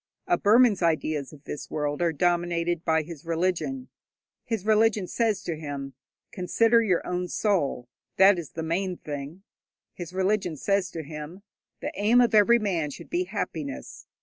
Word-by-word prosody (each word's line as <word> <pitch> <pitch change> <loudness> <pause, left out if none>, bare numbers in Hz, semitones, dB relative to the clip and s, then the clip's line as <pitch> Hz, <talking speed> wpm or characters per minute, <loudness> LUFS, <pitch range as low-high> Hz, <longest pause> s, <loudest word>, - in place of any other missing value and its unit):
A 350 - +3
Burman's 225 - +4
ideas 155 -4 0
of 150 -2 -15
this 150 - -7
world 145 +1 -2
are 170 -1 +2
dominated 175 +1 0
by 160 -1 +2
his 160 -2 -10
religion. 185 +10 -1 0.6
His 225 -4 -3
religion 215 -2 +3
says 220 +2 0
to 170 - -3
him, 140 -3 -6 0.4
'Consider 225 +5 +3
your 185 -6 +1
own 180 0 -2
soul, 170 - 0 0.3
that 190 -1 +6
is 160 - -7
the 160 - -4
main 180 +3 -1
thing.' 145 +5 -7 0.5
His 175 -2 -7
religion 190 -3 0
says 195 +3 0
to 165 -2 -6
him, 150 +5 -8 0.4
'The - - -3
aim 215 +5 +3
of 240 -2 +3
every 215 +3 +6
man 180 -9 -1
should 140 - -11
be 180 +1 0
happiness.' 160 -8 -5
175 Hz, 160 wpm, -26 LUFS, 160-205 Hz, 0.6 s, that